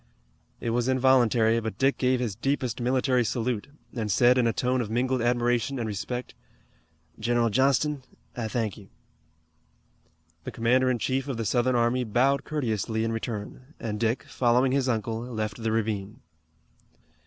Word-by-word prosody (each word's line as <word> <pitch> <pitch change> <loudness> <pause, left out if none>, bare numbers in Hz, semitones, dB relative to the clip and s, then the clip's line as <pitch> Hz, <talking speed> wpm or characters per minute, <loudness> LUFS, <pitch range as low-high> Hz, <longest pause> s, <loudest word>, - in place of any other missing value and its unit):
It 115 - -2
was 120 +1 0
involuntary, 125 -3 +3
but 110 -1 -5
Dick 135 +1 +2
gave 130 -1 +2
his 120 -5 -2
deepest 130 0 -2
military 125 0 +2
salute, 115 0 -2 0.3
and 110 -4 -2
said 125 +5 +4
in 120 - +3
a - - +3
tone 125 +3 0
of 110 - -4
mingled 125 +2 0
admiration 120 +2 +1
and 115 -3 -2
respect: 120 +4 -4 0.9
"General 115 0 +1
Johnston, 135 +4 +2 0.3
I 115 -2 -3
thank 110 -3 -2
you." 100 - -16 1.5
The - - -5
commander 125 +3 +2
in 125 - +1
chief 130 +3 -1
of 135 -4 -3
the 115 - -3
Southern 125 +2 +1
army 120 +1 +2
bowed 130 +5 +1
courteously 110 -6 -1
in 115 - -1
return, 115 +5 -6
and 105 -2 -4
Dick, 115 +2 0
following 125 +1 +2
his 135 -1 +1
uncle, 115 -1 -1
left 110 -3 -4
the 110 0 -1
ravine. 110 -1 -2
120 Hz, 155 wpm, -26 LUFS, 115-130 Hz, 1.5 s, said